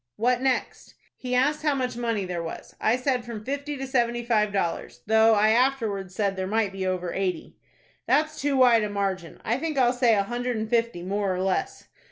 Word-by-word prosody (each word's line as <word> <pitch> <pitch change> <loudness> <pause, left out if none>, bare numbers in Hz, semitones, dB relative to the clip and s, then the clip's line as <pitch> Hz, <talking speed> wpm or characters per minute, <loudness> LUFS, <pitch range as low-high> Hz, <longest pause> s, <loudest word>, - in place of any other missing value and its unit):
"What 245 +3 +1
next?" 265 -1 -2 0.2
"He 250 -1 -3
asked 290 +4 +2
how 300 -2 +1
much 255 -3 -2
money 230 -4 -1
there 175 -2 -3
was. 165 - -8
I 220 - +3
said 255 -1 0
from 225 -3 -8
fifty 285 +2 -3
to 270 - -4
seventy 240 -2 0
five 215 -3 +2
dollars, 170 -10 -3
though 220 0 +5
I 215 +1 +4
afterwards 220 -7 0
said 200 -1 0
there 190 0 -3
might 215 -1 0
be 190 -1 -3
over 180 -2 -2
eighty." 190 -2 -3 0.5
"That's 310 +1 +1
too 280 -1 +1
wide 245 -3 +6
a 210 - -2
margin. 195 -4 -3
I 235 - +1
think 310 -1 -3
I'll 250 -2 +4
say 245 -3 +3
a 200 - +2
hundred 245 +2 -3
and 220 0 -3
fifty, 230 -6 0
more 200 +1 -1
or 185 - -2
less." 190 0 -2
225 Hz, 210 wpm, -25 LUFS, 195-250 Hz, 0.5 s, wide